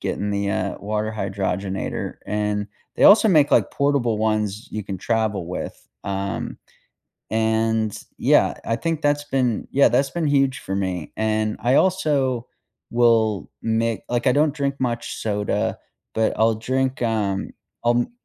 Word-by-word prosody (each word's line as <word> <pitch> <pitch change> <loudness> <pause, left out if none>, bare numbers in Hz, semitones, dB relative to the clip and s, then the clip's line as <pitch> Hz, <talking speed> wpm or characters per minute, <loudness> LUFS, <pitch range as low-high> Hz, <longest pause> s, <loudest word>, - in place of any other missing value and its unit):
getting 105 0 -2
the, 100 0 -1
uh, 95 0 -2
water 110 +1 -2
hydrogenator 95 -1 -3
and 105 0 -1 0.3
they - - +3
also 220 +2 +8
make, 150 -6 +4
like, - - +3
portable 140 -6 +1
ones 110 -1 -1
you 110 - -4
can 95 -1 -5
travel 110 -4 -1
with, 90 - -6 0.2
um, 100 0 -3 0.7
and 110 -1 0
yeah, - - +3
I 115 - 0
think 160 +5 -2
that's 145 0 +1
been 130 -5 0
yeah, 140 - +5
that's 135 0 +2
been 170 -3 -1
huge 135 -2 +2
for 95 - -4
me. 95 -4 -3
And 110 0 0
I 125 +4 +3
also 140 -10 +1 0.4
will 115 -4 +2
make 115 -1 0
like, 120 +1 0
I 125 - +5
don't 150 -1 +3
drink 140 -2 -1
much 120 -2 -2
soda, 105 -2 -1 0.4
but, 110 0 +1
I'll 110 0 +3
drink, 130 +4 -1
um, 105 -4 -1 0.3
I'll 120 0 +4
m 120 - -5
110 Hz, 150 wpm, -22 LUFS, 105-130 Hz, 0.7 s, also